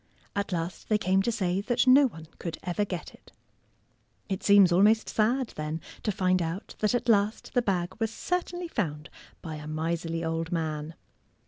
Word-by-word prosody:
At 200 0 -2
last 170 0 -4
they 215 - +4
came 190 -2 +2
to 235 - 0
say 190 -3 0
that 240 +4 +1
no 265 +2 +7
one 160 -9 -10
could 165 -3 -4
ever 180 +3 0
get 180 -4 -6
it. - - -19 1.0
It 190 -1 -2
seems 200 -3 +6
almost 210 +5 +4
sad, 240 +4 +1
then, 155 +1 -4 0.2
to 215 - 0
find 185 -2 +1
out 165 +4 -4
that 215 +3 +2
at 245 0 -1
last 210 -1 +2
the 245 - +3
bag 185 -5 -1
was 225 -1 +1
certainly 355 +6 -3
found 150 - -3 0.3
by 155 -1 -5
a 150 0 -8
miserly 165 +1 -2
old 165 +1 -2
man. 160 -1 -2
185 Hz, 180 wpm, -28 LUFS, 165-220 Hz, 1.0 s, no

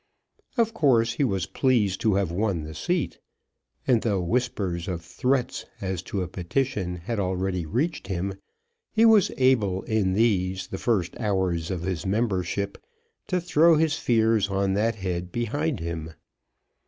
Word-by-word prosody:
Of 225 -1 +2
course 120 - +3
he 140 - 0
was 95 -8 0
pleased 110 -8 +1
to 110 -3 +3
have 95 -4 0
won 95 -3 0
the 80 +1 -7
seat. 175 - -2 0.7
And 120 -4 +3
though 105 -4 0
whispers 95 -3 -1
of 85 -3 -4
threats 130 +6 -1
as 95 -3 -3
to 95 -2 -1
a - - -4
petition 95 +1 -2
had 100 +6 -4
already 95 -2 -1
reached 140 - -1
him, 95 +1 -2 0.6
he 225 0 +4
was 220 -4 +6
able 110 -8 +2
in 105 -4 +1
these, 95 -4 +1
the 95 - -5
first 100 -8 0
hours 95 -6 0
of 90 -3 -3
his 90 -3 -2
membership, 100 -2 -1 0.5
to 180 - +1
throw 170 -1 +4
his 155 -1 +2
fears 110 -5 +2
on 95 0 +1
that 110 +3 +1
head 90 -3 -3
behind 130 - -1
him. 80 -1 -5
100 Hz, 155 wpm, -26 LUFS, 90-125 Hz, 0.7 s, was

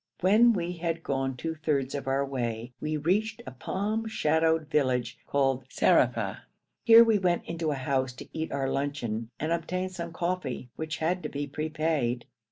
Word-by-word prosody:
When 220 +6 +6
we 175 -3 -2
had 165 -1 -2
gone 135 -1 -1
two 160 +5 -3
thirds 145 -4 -1
of 140 -2 -4
our 135 +1 +1
way 120 -3 -3
we 155 0 -1
reached 210 +8 0
a 130 - -6
palm 210 - -2
shadowed 160 -5 +2
village 125 -5 0
called 135 -2 +1
Zarafa. - - +2 0.4
Here 230 0 +9
we 225 -3 +3
went 180 -2 +1
into 165 -1 -2
a 145 - 0
house 130 -1 0
to 125 - -10
eat 160 0 -3
our 135 -1 -1
luncheon 125 -6 -2
and 155 +2 -1
obtain 180 +3 -1
some 170 -2 -6
coffee, 165 -8 -3
which 160 0 -4
had 175 +3 0
to - - -4
be 145 0 -3
prepaid. 155 -4 -1
155 Hz, 175 wpm, -28 LUFS, 135-170 Hz, 0.4 s, Here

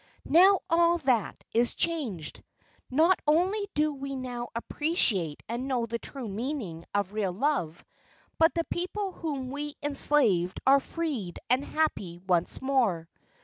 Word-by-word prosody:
"Now 375 +5 +6
all 340 +1 +4
that 255 - 0
is 235 +1 +2
changed. 255 - -2 0.5
Not 325 +8 +4
only 375 +7 +2
do 300 0 +2
we 275 0 -5
now 245 -2 -5
appreciate 230 - 0
and 240 +3 -3
know 250 -3 0
the 230 +1 -4
true 265 -2 -6
meaning 210 - -4
of 200 -1 0
real 205 -3 0
love 200 - -1 0.5
but 325 0 +6
the 335 - +1
people 375 +4 -3
whom 280 -7 -4
we 290 +1 -5
enslaved 275 -11 +2
are 275 +1 +6
freed 275 - -4
and 255 +2 +3
happy 245 - -1
once 180 +4 -1
more. 225 -12 +1
265 Hz, 140 wpm, -28 LUFS, 210-315 Hz, 0.5 s, Now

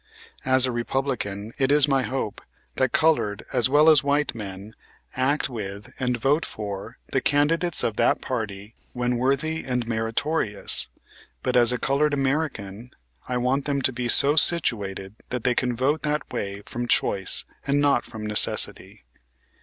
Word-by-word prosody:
As 130 0 +5
a 130 - -1
Republican, 120 -4 -3
it 135 0 +2
is 145 0 +6
my 135 -2 +2
hope 130 -4 -4 0.4
that 130 -2 +1
colored 150 -11 +1
as 125 -1 +3
well 150 +3 +5
as 155 -3 +6
white 145 +1 +1
men, 100 -1 -8 0.4
act 135 +3 +1
with 105 -4 -7
and 125 -2 0
vote 140 +7 +1
for 105 +1 -6
the 135 - +1
candidates 155 +4 +1
of 110 - -1
that - - +3
party 105 -4 -5 0.2
when 125 0 -1
worthy 140 +6 0
and 125 -2 -2
meritorious, 115 +1 +1 0.6
but 125 - -1
as 120 -1 +5
a 125 - -1
colored 145 +3 +1
American, 130 -6 -2 0.4
I 125 - 0
want 130 +3 0
them 140 -1 0
to 130 - +2
be 120 0 -3
so 140 +5 +4
situated 105 - 0
that 125 -2 -3
they 125 - +2
can 125 0 -1
vote 140 +6 0
that 150 -2 -2
way 100 -3 -4
from 120 0 -4
choice 95 -4 +2 0.2
and 140 +1 +2
not 145 -1 +3
from 110 -2 -8
necessity. 105 0 0
125 Hz, 160 wpm, -24 LUFS, 110-140 Hz, 0.6 s, is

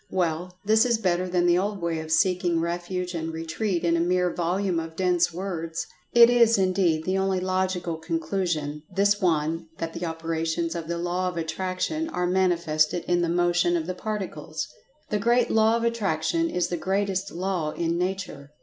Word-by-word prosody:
Well, 180 0 -2
this 220 +2 +5
is 240 -2 +2
better 185 -3 0
than 175 -1 +2
the 175 0 +4
old 200 +1 -2
way 170 -2 -1
of 160 0 -6
seeking 175 0 +2
refuge 175 +2 -3
and 165 -1 -3
retreat 165 +3 -2
in 170 -1 +3
a - - +1
mere 180 +1 +1
volume 180 +1 0
of 160 0 -6
dense 180 -1 +2
words. 165 -2 -4 0.3
It 235 -1 +8
is 235 -2 +5
indeed 185 -4 +2
the 190 +1 +1
only 190 -1 +1
logical 185 -2 -1
conclusion, 160 -2 -2
this 205 +1 +2
one 165 -1 0
that 165 0 -4
the 170 0 -3
operations 165 0 -2
of 165 -2 -5
the 170 0 -2
Law 175 +2 -1
of 180 - -7
Attraction 185 - -2
are 180 - -1
manifested 175 -3 +1
in 175 0 +1
the 170 - 0
Motion 175 0 +2
of 160 - -3
the 185 - -3
Particles. 170 -7 -4 0.4
This 210 -1 0
great 240 +1 +3
Law 220 +1 +4
of 230 - -3
Attraction 235 - 0
is 180 - -1
the 175 - -2
greatest 195 +1 -1
Law 180 -3 -2
in 165 +2 -1
Nature. 180 -6 -3
175 Hz, 180 wpm, -25 LUFS, 165-190 Hz, 0.4 s, It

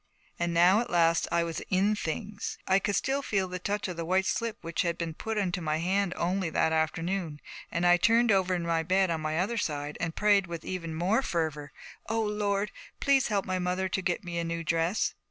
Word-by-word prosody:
And 175 0 0
now 175 +4 +5
at 240 - -2
last 165 -1 +3
I 170 0 +2
was 165 -1 -3
in 195 +3 +2
things. 205 +3 -4
I 190 +1 +4
could 200 +1 -1
still 275 +1 0
feel 195 -7 0
the 180 0 -5
touch 205 +3 -2
of 180 -2 -6
the 165 - -2
white 185 +3 +1
slip 230 +1 -1
which 165 -1 -1
had 170 -1 -1
been 165 -2 -3
put 220 +6 -4
into 180 -3 0
my 155 -1 0
hand 185 +3 0
only 180 0 0
that 160 0 +1
afternoon; 165 0 -1 0.3
and 170 +1 -1
I 175 0 +6
turned 230 +3 +4
over 190 -2 +2
in 175 - -2
my 165 -1 +1
bed 185 +2 +2
on 160 -1 -1
my 155 0 -1
other 205 +6 0
side 145 -3 -3
and 165 -1 -2
prayed 205 -2 +3
with 170 -1 -6
even 165 -3 -4
more 185 +9 +2
fervor. 155 - -2 0.4
'O 225 0 0
Lord, 210 -1 0 0.3
please 275 -2 +3
help 205 -3 0
my 185 -1 -1
mother 180 +1 0
to 190 +1 -1
get 180 0 -1
me 175 -1 -4
a - - -1
new 165 0 -3
dress.' 165 +4 0
180 Hz, 225 wpm, -29 LUFS, 165-200 Hz, 0.4 s, I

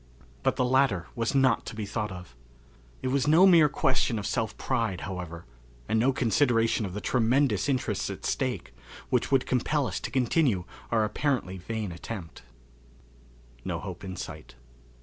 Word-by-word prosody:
But - - +1
the 125 - +1
latter 125 -9 +2
was 115 +3 -1
not 130 -4 +3
to - - -6
be 110 -1 -4
thought 105 0 -3
of. 90 -8 -10 0.7
It 130 - 0
was 140 +1 +1
no 165 +5 +7
mere 170 -5 +7
question 130 -4 +1
of 105 - -4
self 110 0 -2
pride, 115 -9 -1
however, 90 -3 -6 0.4
and 110 - +2
no 130 +4 +4
consideration 115 -3 +2
of 95 - -8
the 105 - -4
tremendous 125 -2 +2
interests 130 -2 -1
at - - -7
stake, - - -2 0.4
which - - +1
would 135 -2 +3
compel 135 +3 +1
us 95 -7 -3
to - - -5
continue 125 - +2 0.3
our 115 -2 +2
apparently 105 -4 -1
vain 110 +1 -4
attempt. 85 0 -7 1.2
No - - -2
Hope - - -7
in 95 -1 -6
Sight. 80 -5 -8
115 Hz, 165 wpm, -28 LUFS, 95-130 Hz, 1.2 s, no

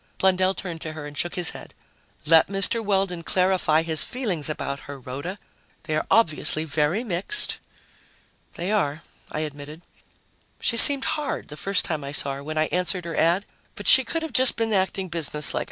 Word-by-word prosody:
Blundell 190 0 +1
turned 170 -4 -7
to 155 - -6
her 155 -1 -8
and 145 0 -10
shook 175 +3 -3
his 175 -2 +5
head. - - -12 0.5
"Let 160 +1 +5
Mr. 195 +4 0
Weldon 195 -4 -1
clarify 180 -3 +1
his 160 -2 -2
feelings 195 - -3
about 140 -2 -4
her, 140 - -7
Rhoda. 140 +9 -7 0.5
They 155 - -3
are 155 - -2
obviously 155 -6 +2
very 155 +7 -1
mixed." 205 - -1 0.9
"They 180 +4 -4
are," 160 -6 -1 0.3
I 155 - -3
admitted. 150 +2 -8 0.8
"She 235 - -1
seemed 275 +3 +9
hard, 300 -2 -3
the 150 - -9
first 195 +4 0
time 155 -3 -3
I 140 +1 -7
saw 140 -2 -1
her, 140 +1 -8
when 155 +2 -6
I 155 - +2
answered 180 0 -2
her 170 - -5
ad, 175 +5 +1 0.3
but 205 - -8
she 265 - +8
could 325 +7 -4
have 320 - -5
been 240 -3 +3
just - - -2
acting 190 0 -1
businesslike. 155 -3 0
170 Hz, 185 wpm, -23 LUFS, 155-195 Hz, 0.9 s, seemed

